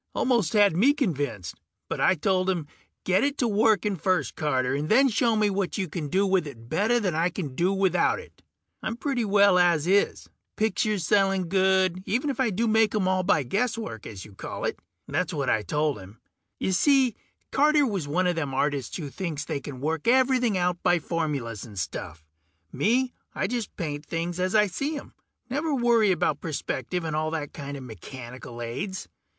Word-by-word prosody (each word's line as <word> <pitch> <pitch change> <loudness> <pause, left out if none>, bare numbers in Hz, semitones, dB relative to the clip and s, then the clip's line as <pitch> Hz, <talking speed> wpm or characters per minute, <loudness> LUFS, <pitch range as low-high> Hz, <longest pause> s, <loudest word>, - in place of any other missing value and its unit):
Almost 235 -9 +1
had 205 -5 +5
me 250 +11 +5
convinced, 145 - -2 0.3
but - - -3
I 185 - +4
told 185 +3 +1
him, 175 -5 -1 0.4
"Get 185 0 +2
it 285 0 0
to 245 - +1
working 210 -2 +2
first, 185 +1 0
Carter, 130 -4 0
and 145 +2 -2
then 270 +5 +5
show 230 +1 +2
me 215 -1 +3
what 195 0 -2
you 190 -2 -1
can 155 -1 -4
do 190 +7 +2
with 190 -4 +1
it 115 -5 -11
better 220 - +2
than 190 -6 -1
I 165 +3 +1
can 155 -8 -5
do 175 +7 +1
without 190 -3 +2
it. - - -13 0.4
I'm 220 - -2
doing - - -9
pretty 255 -4 -1
well 200 -2 +5
as 170 -4 +3
is... 195 +3 +1 0.3
pictures 215 -4 0
selling 195 -2 +2
good, 190 -1 +2
even 255 +7 0
if 270 - -8
I 260 -3 +2
do 220 +4 0
make 220 -1 +3
'em 195 -3 +1
all 185 0 +2
by 180 -5 +2
guesswork, 210 - -2
as 95 -3 -8
you 105 - -14
call - - -6
it." - - -2 0.3
That's - - -1
what - - 0
I 110 - +2
told 150 +4 -1
him. 100 +3 -13 0.4
Y'see, 255 +6 +3 0.4
Carter 295 +1 +4
was 195 - -2
one 175 +6 +1
a 180 - +2
them 145 -5 -3
artists 140 -3 -1
that 150 -6 -6
think 160 -6 -4
they 145 - -3
can 130 -1 -8
work 160 +4 -2
everything 250 -4 +3
out 180 -1 0
by 175 - +3
formulas 145 - -3
and 105 -5 -11
stuff. 85 -3 -5 0.5
Me, 250 +4 +1 0.2
I - - 0
just 235 +1 -4
paint 150 -5 -4
things 170 +2 -3
as 185 +3 0
I 210 -1 +6
see 280 - -3
'em. - - -10 0.3
Never 295 +3 -1
worry 235 -5 +3
about 155 -4 0
perspective 155 +1 -3
and 160 -2 -3
all 155 0 0
that 155 -3 -4
kinda 140 -1 -6
mechanical 120 - -9
aids. 150 - -5
185 Hz, 195 wpm, -26 LUFS, 150-215 Hz, 0.5 s, I